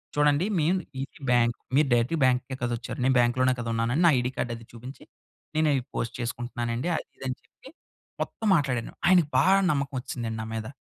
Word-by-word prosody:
చూడండి, 145 +3 +3
మేం 165 +5 +2 0.3
ఇది 140 - -12
బ్యాంక్, 120 -1 +3 0.2
మీరు 145 0 +4
డైరెక్ట్‌గా 120 +7 +1
బ్యాంక్‌కే 130 +1 +1
కదా 120 0 0
వచ్చారు. 125 - -7
నేను 130 0 +3
బ్యాంక్‌లోనే 130 +2 +3
కదా 115 - -4
ఉన్నానని, 120 +7 +1
నా 165 - +7
ఐడీ 125 +1 -1
కార్డ్ 120 - -1
అది 115 0 -12
చూపించి, 125 +4 -10 0.5
నేను 155 0 +3
అయి 135 - +1
పోస్ట్ 115 - -2
చేసుకుంటున్నానండి. 120 +2 -3
అది - - -4
ఇది - - -11
అని 130 - -2
చెప్పి, 265 - -17 0.5
మొత్తం 220 - -3
మాట్లాడాను. 130 -7 -1
ఆయనకి 175 -4 +5
బాగా 195 +1 +5
నమ్మకం 140 -1 -1
వచ్చిసిదండి, 115 -3 -5
నా - - -5
మీద. 110 -1 -4
125 Hz, 190 wpm, -26 LUFS, 120-145 Hz, 0.5 s, నా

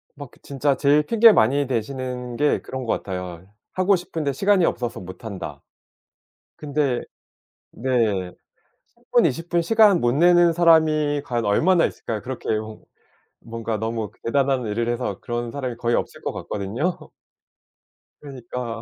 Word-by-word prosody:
막 145 -3 -10
그 - - -22
진짜 140 0 0
제일 145 +2 +3
핑계 230 +7 +6
많이 140 - +2
대시는 125 0 -4
게 150 +2 +2
그런 130 -1 -6
것 115 - +1
같아요. 90 -2 -6 0.3
"하고 185 +2 +3
싶은데 160 -5 -3
시간이 195 +4 +3
없어서 120 -6 -2
못 95 +2 -11
한다." 85 -10 -7 1.0
근데 145 -4 -1 0.7
네. 110 -8 0 0.6
10 240 -1 +1
20 165 +4 -3
분 175 0 +2
시간 210 0 +4
못 120 0 +2
내는 175 +3 +5
사람이 155 -3 +3
과연 120 -2 -2
얼마나 165 - +3
있을까요? 110 -2 -5
그렇게 130 0 -7
뭔 110 0 -8 0.6
뭔가 115 -1 -4
너무 110 -1 -3
대단한 135 0 +1
일을 115 +2 -2
해서 120 -5 -3
그런 120 0 -3
사람이 130 -3 -4
거의 120 0 0
없을 - - -3
것 - - -3
같거든요. 115 - -3 1.2
그러니까 125 -4 -6
130 Hz, 280 characters per minute, -23 LUFS, 115-155 Hz, 1.2 s, 핑계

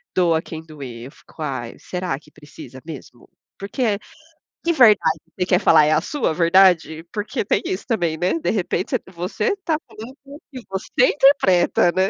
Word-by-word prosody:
doa 170 -3 +3
a - - -6
quem 160 -1 -9
doer". 130 -7 -9
Eu 135 - -10
fico: 160 - -16
"Ai, 130 -5 -4
será 180 -5 -4
que - - -22
precisa 145 -3 -13
mesmo?". 140 -6 -11 0.3
Porque 205 +1 -1 0.6
que 340 0 +1
verdade 215 - +4 0.2
você 180 - +1
quer 180 -1 +3
falar? 150 - +5
É 155 - +2
a 155 - +2
sua 275 - -2
verdade? 170 -2 +3
Porque 210 +2 -3
tem - - +1
isso 375 +1 -3
também, 175 -9 0
né. 180 - 0
De - - -2
repente 185 -3 -2
c - - -22
você 185 - -2
tá 315 -2 +1
falando 235 +5 -11
com 280 +1 -12
o - - -14
que 255 -2 -8
você 195 +6 +1
interpreta, 190 -12 +4
né? 190 +1 +1
180 Hz, 190 wpm, -21 LUFS, 160-225 Hz, 0.6 s, falar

